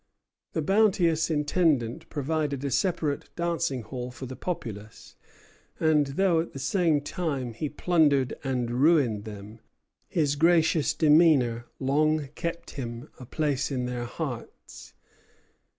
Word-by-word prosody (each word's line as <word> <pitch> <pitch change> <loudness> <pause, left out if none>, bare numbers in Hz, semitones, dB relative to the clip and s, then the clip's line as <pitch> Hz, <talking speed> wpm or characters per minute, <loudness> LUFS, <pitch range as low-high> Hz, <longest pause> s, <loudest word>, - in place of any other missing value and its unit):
The 160 - -1
bounteous 180 -4 +3
Intendant 150 -5 0
provided 145 -1 -2
a 140 - -2
separate 160 -3 -1
dancing 170 -7 -1
hall 125 +2 -6
for 125 +1 -8
the 130 +1 -7
populace; 110 - -6 0.6
and, 155 -3 +3
though 170 +4 +2
at 165 - -3
the - - -7
same 160 0 +1
time 140 -7 -3
he 145 +6 -3
plundered 150 -5 +2
and 125 -3 -1
ruined 135 -10 +3
them, 105 +1 -9 0.5
his 145 -4 0
gracious 160 -1 +3
demeanor 150 -7 +4
long 150 +2 +1
kept 170 +2 -5
him 120 -1 -6
a 125 - -10
place 150 -2 -1
in 130 -3 -2
their 125 -1 -3
hearts. 120 - -7
145 Hz, 125 wpm, -27 LUFS, 125-160 Hz, 0.6 s, demeanor